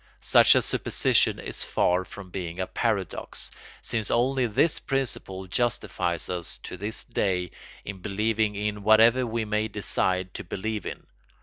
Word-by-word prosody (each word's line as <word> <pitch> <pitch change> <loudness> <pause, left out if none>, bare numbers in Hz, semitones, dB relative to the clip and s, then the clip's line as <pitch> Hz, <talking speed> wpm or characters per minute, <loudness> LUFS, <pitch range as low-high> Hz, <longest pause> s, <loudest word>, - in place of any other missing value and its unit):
Such - - +6
a - - +3
supposition - - +2
is - - -2
far 90 +1 +1
from 95 -3 -11
being 90 -1 -5
a 95 - 0
paradox, 105 -2 -2 0.3
since 110 -3 -1
only 130 +1 +2
this 150 +9 +2
principle 120 -8 -3
justifies 90 -5 -1
us 90 -2 -2
to - - -6
this 105 +4 -2
day 90 -3 -1 0.3
in 100 -1 -6
believing 105 +2 0
in 105 0 -2
whatever 115 +4 +5
we 115 0 -2
may 105 +1 0
decide 95 -3 -1
to - - -6
believe 105 +3 -4
in. - - -7
105 Hz, 145 wpm, -26 LUFS, 95-110 Hz, 0.3 s, Such